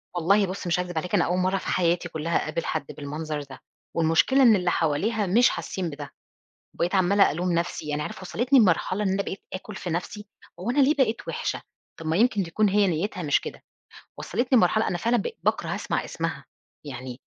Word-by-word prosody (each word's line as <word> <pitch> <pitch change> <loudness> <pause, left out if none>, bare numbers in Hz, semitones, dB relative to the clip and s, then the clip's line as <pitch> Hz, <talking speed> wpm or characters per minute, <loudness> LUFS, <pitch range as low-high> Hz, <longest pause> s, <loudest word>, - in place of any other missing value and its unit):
والله 195 +4 +3
بُصّ 185 0 -5
مش 175 +1 +1
هاكذب 180 -2 -4
عليك، 180 +3 -1
أنا - - +3
أول 180 - 0
مرّه 185 +1 +1
في - - -7
حياتي 175 0 +1
كُلّها 160 +1 -1
أقابل 170 - -3
حد 155 -2 -2
بالمنظر 150 +1 -4
ده، 135 -1 -12 0.4
والمشكلة 165 +12 +4
إن 230 -4 +7
اللي 180 -2 +1
حواليها 200 +8 0
مش 235 +7 +5
حاسين 185 -3 -4
بده، 145 -1 -8 0.6
وبقيت 175 +3 -1
عمّالة 195 +2 +4
ألوم 175 +4 -1
نفسي 170 -2 -2
يعني 150 0 -1
عارف 150 - -6
وصّلتني 245 +8 +2
لمرحلة 190 0 +2
إن 200 - +1
أنا 195 +1 0
بقيت 195 - -6
آكُل 195 +2 -7
في 180 - -5
نفسي، 180 +5 -4 0.3
هو 190 +6 -3
أنا 260 +4 +1
ليه 280 +2 +5
بقيت 250 -6 0
وحشة، - - -3 0.4
طَب 165 - -8
ما 160 +2 +1
يمكن 220 -2 +3
تكون 200 +5 +1
هي 200 0 +3
نيتها 180 +2 -2
مش 145 -2 +2
كده، - - -8 0.6
وصّلتني 255 +1 +1
لمرحلة 220 0 +3
أنا 175 - -2
فعلًا 235 +4 +2
ب - - -1 0.2
باكره - - 0
أسمع - - -2
اسمها، - - -4 0.4
يعني 130 -1 -7
180 Hz, 200 wpm, -25 LUFS, 165-210 Hz, 0.6 s, إن